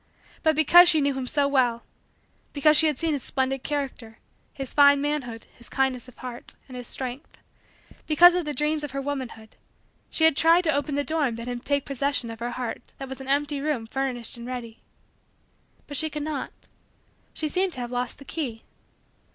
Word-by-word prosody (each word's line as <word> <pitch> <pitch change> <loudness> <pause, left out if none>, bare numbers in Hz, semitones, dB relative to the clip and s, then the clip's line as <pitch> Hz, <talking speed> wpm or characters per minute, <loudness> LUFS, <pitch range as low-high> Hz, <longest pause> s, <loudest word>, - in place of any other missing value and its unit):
But 315 -2 +3
because 345 +3 +7
she 320 -3 +5
knew 280 -1 +1
him 265 -1 -4
so 285 +1 +2
well; 245 -4 +1 0.7
because 305 +1 +4
she 320 - +6
had 300 -4 0
seen 325 0 0
his 285 - -2
splendid 265 +1 -1
character, 270 -6 -4 0.3
his 270 -2 -6
fine 285 -1 +6
manhood, 280 -6 -3
his 235 - -15
kindness 265 -2 0
of 255 - -15
heart, 245 -2 -8
and 255 - -10
his 245 -1 -7
strength; 260 +2 -5 0.7
because 345 +3 +7
of 360 0 0
the 300 -1 -3
dreams 300 0 0
of 295 - -3
her 275 - -2
womanhood; 260 -6 -6 0.5
she 320 - -1
had 320 -2 +6
tried 330 +4 +5
to 315 -2 +2
open 285 +1 -1
the 285 - +1
door 315 -1 0
and 230 -2 -4
bid 230 +1 -7
him 245 -1 -3
take 280 +2 -1
possession 275 -3 -1
of 225 - -9
her 240 +1 -3
heart 250 -2 -4 0.2
that 270 -1 -7
was 265 - -6
as - - -11
an 265 - -9
empty 285 +1 0
room 285 -6 -1
furnished 245 -1 -3
and 235 0 -8
ready. 240 -3 -7 1.0
But 285 - -4
she 315 +4 0
could 300 -1 -5
not. 300 -3 -6 0.7
She 310 - 0
seemed 370 +3 0
to 255 - -6
have 240 0 -5
lost 245 -1 -3
the 275 - -13
key. 255 -9 -4
275 Hz, 205 wpm, -25 LUFS, 250-300 Hz, 1.0 s, because